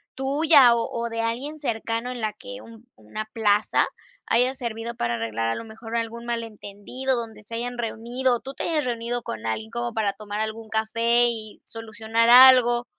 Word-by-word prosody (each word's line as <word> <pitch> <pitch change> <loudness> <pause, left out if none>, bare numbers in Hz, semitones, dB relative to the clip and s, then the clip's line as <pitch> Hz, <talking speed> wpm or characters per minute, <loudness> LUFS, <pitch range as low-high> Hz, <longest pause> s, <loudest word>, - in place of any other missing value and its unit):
tuya 275 -2 +5
o 230 - 0
o 235 0 -2
de 230 0 -3
alguien 255 +7 -3
cercano 230 -2 -3
en 250 - -6
la 215 -2 -2
que 250 +4 -10
un 230 0 -14
una 110 - -6
plaza 210 -1 +2 0.4
haya 250 +3 +2
servido 235 -2 -5
para 120 - -1
arreglar 115 0 -2
a 115 - 0
lo - - -6
mejor 225 +1 -9
algún 230 0 -3
mal 235 -1 -2
entendido 225 +4 -3
donde 230 -3 -5
se 230 +2 -8
hayan 245 +1 -4
reunido, 240 +2 -1
o - - -4
tú 270 - -8
te - - -5
hayas 315 -3 0
reunido 240 0 -3
con 110 - -6
algo 230 - -3
para 215 -3 0
tomar 210 +1 -5
algún 220 +1 -5
café 230 +2 +2
y 220 -2 -6
solucionar 225 +1 -1
algo 245 -1 +7
230 Hz, 185 wpm, -24 LUFS, 220-245 Hz, 0.4 s, algo